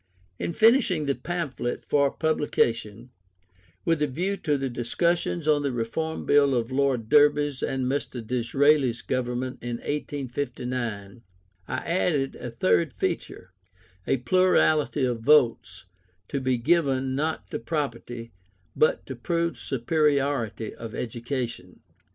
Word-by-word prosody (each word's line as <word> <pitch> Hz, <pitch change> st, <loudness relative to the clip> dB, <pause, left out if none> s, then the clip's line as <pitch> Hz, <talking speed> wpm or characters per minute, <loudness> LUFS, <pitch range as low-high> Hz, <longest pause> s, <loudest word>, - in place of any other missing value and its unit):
In 170 Hz, -, -2 dB
finishing 220 Hz, -, +4 dB
the 140 Hz, -, +1 dB
pamphlet 155 Hz, -8 st, -4 dB
for 140 Hz, -1 st, +3 dB
publication, 120 Hz, -7 st, -1 dB, 0.7 s
with 165 Hz, -2 st, +1 dB
a 150 Hz, -, +3 dB
view 180 Hz, +9 st, -2 dB
to 150 Hz, -6 st, 0 dB
the 135 Hz, 0 st, -2 dB
discussions 160 Hz, +7 st, -1 dB
on 150 Hz, -1 st, +4 dB
the 140 Hz, -1 st, -1 dB
Reform 125 Hz, +7 st, -3 dB
Bill 140 Hz, -2 st, +4 dB
of 120 Hz, +1 st, -1 dB
Lord 130 Hz, -4 st, +1 dB
Derby's 145 Hz, 0 st, +4 dB
and 130 Hz, -1 st, -1 dB
Mr. 130 Hz, -3 st, -3 dB
Disraeli's 125 Hz, 0 st, +2 dB
Government 125 Hz, 0 st, -2 dB
in 120 Hz, 0 st, -3 dB
1859, 125 Hz, -6 st, -4 dB, 0.5 s
I -, -, -3 dB
added 165 Hz, -6 st, 0 dB
a 125 Hz, -, -6 dB
third 95 Hz, -7 st, +1 dB
feature, 90 Hz, 0 st, -4 dB, 0.6 s
a -, -, +2 dB
plurality 155 Hz, -1 st, +3 dB
of 120 Hz, -2 st, -1 dB
votes, 110 Hz, -9 st, +3 dB, 0.4 s
to 140 Hz, -, -1 dB
be 130 Hz, -1 st, +1 dB
given, 135 Hz, -1 st, +1 dB
not 155 Hz, +4 st, -2 dB
to -, -, -3 dB
property, 120 Hz, -6 st, -4 dB, 0.4 s
but 155 Hz, -, +2 dB
to 130 Hz, -, -6 dB
proved 170 Hz, +6 st, -1 dB
superiority 140 Hz, -4 st, 0 dB
of 115 Hz, -1 st, -8 dB
education. 120 Hz, -5 st, -5 dB
135 Hz, 125 wpm, -26 LUFS, 120-150 Hz, 0.7 s, finishing